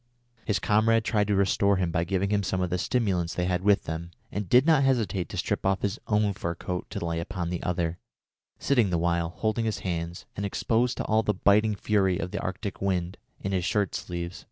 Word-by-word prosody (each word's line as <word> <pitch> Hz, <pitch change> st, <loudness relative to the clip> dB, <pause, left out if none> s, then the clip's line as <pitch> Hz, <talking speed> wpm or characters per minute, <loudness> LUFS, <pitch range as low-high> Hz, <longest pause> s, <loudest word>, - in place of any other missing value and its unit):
His 105 Hz, -, +1 dB
comrade 110 Hz, +1 st, +3 dB
tried 105 Hz, -2 st, +1 dB
to 105 Hz, -, +2 dB
restore 100 Hz, 0 st, +3 dB
him 90 Hz, -3 st, 0 dB
by 85 Hz, 0 st, 0 dB
giving 95 Hz, +2 st, 0 dB
him 105 Hz, -1 st, +2 dB
some 95 Hz, -1 st, -1 dB
of 90 Hz, -1 st, -1 dB
the 90 Hz, -, 0 dB
stimulants 95 Hz, -7 st, 0 dB
they 90 Hz, -, 0 dB
had 90 Hz, 0 st, 0 dB
with 100 Hz, 0 st, +3 dB
them, 80 Hz, +2 st, -5 dB, 0.2 s
and 100 Hz, -3 st, -4 dB
did 125 Hz, +3 st, +6 dB
not 155 Hz, -4 st, +5 dB
hesitate 115 Hz, -8 st, +1 dB
to -, -, -6 dB
strip -, -, -1 dB
off 95 Hz, 0 st, +1 dB
his 100 Hz, +2 st, -1 dB
own 105 Hz, -1 st, +2 dB
fur 85 Hz, -2 st, -3 dB
coat 90 Hz, +1 st, -5 dB
to -, -, -4 dB
lay 85 Hz, 0 st, -1 dB
upon 85 Hz, 0 st, -4 dB
the 90 Hz, -, -3 dB
other, 85 Hz, -1 st, -1 dB, 0.6 s
sitting 120 Hz, -7 st, +2 dB
the 90 Hz, -, +1 dB
while, 85 Hz, 0 st, +1 dB
holding 110 Hz, +5 st, -1 dB
his 105 Hz, -2 st, -2 dB
hands, 85 Hz, -2 st, -4 dB
and 100 Hz, -, -4 dB
exposed 115 Hz, +4 st, 0 dB
to -, -, -2 dB
all 110 Hz, 0 st, +3 dB
the 105 Hz, -2 st, 0 dB
biting 105 Hz, +2 st, +3 dB
fury 95 Hz, -3 st, +1 dB
of 90 Hz, -2 st, -4 dB
the -, -, -3 dB
Arctic 95 Hz, +2 st, -4 dB
wind, 90 Hz, -2 st, -1 dB, 0.2 s
in 95 Hz, -, -2 dB
his 95 Hz, -2 st, 0 dB
shirt 100 Hz, +1 st, 0 dB
sleeves. 85 Hz, 0 st, -5 dB
95 Hz, 225 wpm, -27 LUFS, 90-105 Hz, 0.6 s, did